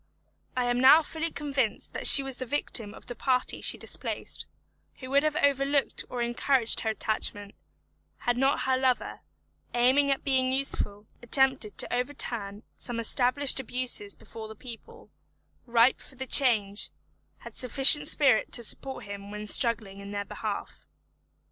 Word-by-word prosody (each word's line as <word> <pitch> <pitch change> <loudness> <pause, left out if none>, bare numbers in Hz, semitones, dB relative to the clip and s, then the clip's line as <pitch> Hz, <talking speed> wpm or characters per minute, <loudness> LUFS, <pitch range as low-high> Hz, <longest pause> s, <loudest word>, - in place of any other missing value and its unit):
I 250 - 0
am 245 0 -1
now 285 +5 +6
fully 320 +2 -3
convinced 275 -7 -3
that - - +2
she 275 - +9
was 270 -2 -3
the 255 - -6
victim 230 -5 -2
of - - -12
the 245 - -7
party 255 +2 -1
she - - -1
displaced, - - -2 0.5
who 255 0 -11
would 280 +1 +3
have 305 0 -1
overlooked 280 -1 0
or 245 -1 -3
encouraged 240 0 +2
her 220 - -2
attachment, 210 -2 -2 0.7
had 245 - 0
not 270 +3 0
her 260 0 0
lover, 260 -1 -1 0.6
aiming 260 +4 +2
at 275 - -1
being 260 -2 0
useful, 215 -6 -2 0.2
attempted 260 -3 +1
to - - -2
overturn 235 -5 -4
some 240 -2 -1
established 255 +4 +2
abuses 250 -5 -2
before 220 -1 -11
the 220 - -11
people, 260 - -13 0.6
ripe 235 +2 +3
for - - -12
the 265 +1 -7
change, 220 -7 +2 0.5
had - - -12
sufficient 270 +3 +5
spirit 270 -7 +3
to 240 - +4
support 265 +4 -4
him 200 0 -9
when 210 0 -7
struggling 215 -3 +1
in 200 0 -10
their 205 0 -5
behalf. - - -7
250 Hz, 155 wpm, -27 LUFS, 220-270 Hz, 0.7 s, she